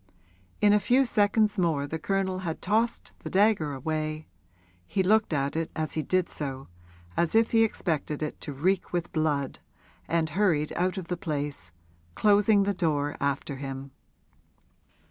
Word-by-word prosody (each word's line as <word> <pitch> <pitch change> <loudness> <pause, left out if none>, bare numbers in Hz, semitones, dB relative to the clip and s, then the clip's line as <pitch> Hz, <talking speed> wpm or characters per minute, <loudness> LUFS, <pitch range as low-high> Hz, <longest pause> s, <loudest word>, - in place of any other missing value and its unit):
In 205 0 +6
a 210 - +5
few 255 +6 +3
seconds 210 -2 +2
more 160 -5 +1
the 160 +3 -4
Colonel 190 +2 -1
had 170 -4 -4
tossed 225 +4 0
the - - -7
dagger 195 -6 +3
away 155 +2 -3 0.6
he 190 - 0
looked 215 +2 +3
at 140 -1 -1
it 165 0 -1
as 155 -1 -2
he 155 - -1
did 185 +3 +1
so, 135 -2 -5 0.5
as 170 - +1
if 225 0 +4
he 225 -1 +5
expected 155 -8 -2
it 150 - -5
to - - -5
reek 180 +7 0
with 175 -1 -2
blood 150 -4 -1 0.5
and 165 -2 0
hurried 165 -5 +1
out 185 +2 0
of 185 -3 -5
the 180 - -2
place, 145 - -4 0.4
closing 205 0 +4
the 200 +1 0
door 150 -5 0
after 140 0 -2
him. 135 0 -6
165 Hz, 160 wpm, -27 LUFS, 150-200 Hz, 0.6 s, In